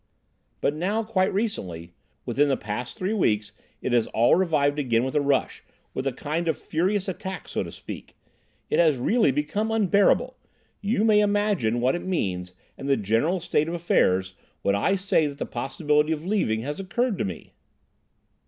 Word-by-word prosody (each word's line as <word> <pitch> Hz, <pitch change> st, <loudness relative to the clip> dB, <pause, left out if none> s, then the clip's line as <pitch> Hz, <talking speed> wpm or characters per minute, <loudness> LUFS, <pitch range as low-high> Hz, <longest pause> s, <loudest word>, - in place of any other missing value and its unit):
"But 145 Hz, -, +1 dB
now, 195 Hz, +8 st, -1 dB
quite 205 Hz, -3 st, +1 dB
recently, 90 Hz, -, -3 dB, 0.3 s
within 145 Hz, +1 st, +2 dB
the 135 Hz, -, +2 dB
past 105 Hz, +4 st, -5 dB
three 185 Hz, +3 st, -1 dB
weeks, 105 Hz, -, +1 dB, 0.3 s
it -, -, -1 dB
has 120 Hz, -2 st, +3 dB
all 115 Hz, +2 st, +3 dB
revived 150 Hz, -5 st, +2 dB
again 120 Hz, -4 st, +1 dB
with 130 Hz, -, -2 dB
a 150 Hz, -, +2 dB
rush—with 140 Hz, -1 st, -2 dB
a -, -, +1 dB
kind 155 Hz, +6 st, -3 dB
of 160 Hz, -, +1 dB
furious 190 Hz, +5 st, -1 dB
attack, 190 Hz, 0 st, -5 dB
so -, -, -2 dB
to -, -, -5 dB
speak. -, -, -9 dB, 0.6 s
It -, -, +2 dB
has 160 Hz, -5 st, +4 dB
really 215 Hz, -, +3 dB
become 150 Hz, -, -1 dB
unbearable. 220 Hz, -, +3 dB, 0.5 s
You 205 Hz, +1 st, +1 dB
may 215 Hz, -2 st, +5 dB
imagine 205 Hz, -, +1 dB
what 130 Hz, +2 st, +3 dB
it 175 Hz, -, -2 dB
means, 90 Hz, -, -2 dB, 0.3 s
and 140 Hz, -, -4 dB
the 135 Hz, -, +4 dB
general 115 Hz, -, +1 dB
state 155 Hz, -2 st, 0 dB
of 170 Hz, -, -2 dB
affairs, 95 Hz, -, +2 dB, 0.3 s
when 100 Hz, -, +2 dB
I 100 Hz, -, +2 dB
say 190 Hz, -5 st, +2 dB
that 140 Hz, -1 st, -7 dB
the -, -, -3 dB
possibility 150 Hz, +4 st, 0 dB
of 155 Hz, +1 st, -6 dB
leaving 185 Hz, -, 0 dB
has 145 Hz, +7 st, -4 dB
occurred 220 Hz, +3 st, -1 dB
to -, -, +1 dB
me." 90 Hz, -4 st, -6 dB
155 Hz, 175 wpm, -25 LUFS, 120-195 Hz, 0.6 s, may